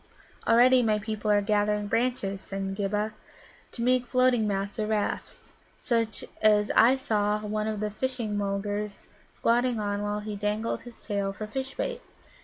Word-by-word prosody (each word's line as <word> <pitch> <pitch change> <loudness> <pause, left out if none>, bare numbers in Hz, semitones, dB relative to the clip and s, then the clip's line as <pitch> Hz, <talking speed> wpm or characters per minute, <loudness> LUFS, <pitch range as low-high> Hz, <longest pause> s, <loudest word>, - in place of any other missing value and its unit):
"Already 250 +2 +6
my 215 -3 +2
people 215 0 -3
are 205 -1 +4
gathering 210 0 +1
branches," 205 -4 -1
said 195 0 -4
Ghibba, 210 +2 -1 0.6
"to 235 - -4
make 250 0 +2
floating 255 -3 +3
mats 200 +1 -2
or 215 - 0
rafts, 215 -1 -3 0.3
such 230 -3 -1 0.2
as 210 -1 +4
I 245 +4 +7
saw 210 -5 0
one 215 0 -1
of 215 -1 -2
the 210 0 -1
Fishing 235 -2 -2
mulgars 205 +1 -3 0.2
squatting 240 0 +1
on 205 -1 -1
while 205 0 -2
he 210 0 -5
dangled 210 +2 -1
his 240 -1 -13
tail 200 -2 -1
for 215 - -6
fish 265 +5 -5
bait. - - -3
210 Hz, 160 wpm, -27 LUFS, 205-235 Hz, 0.6 s, I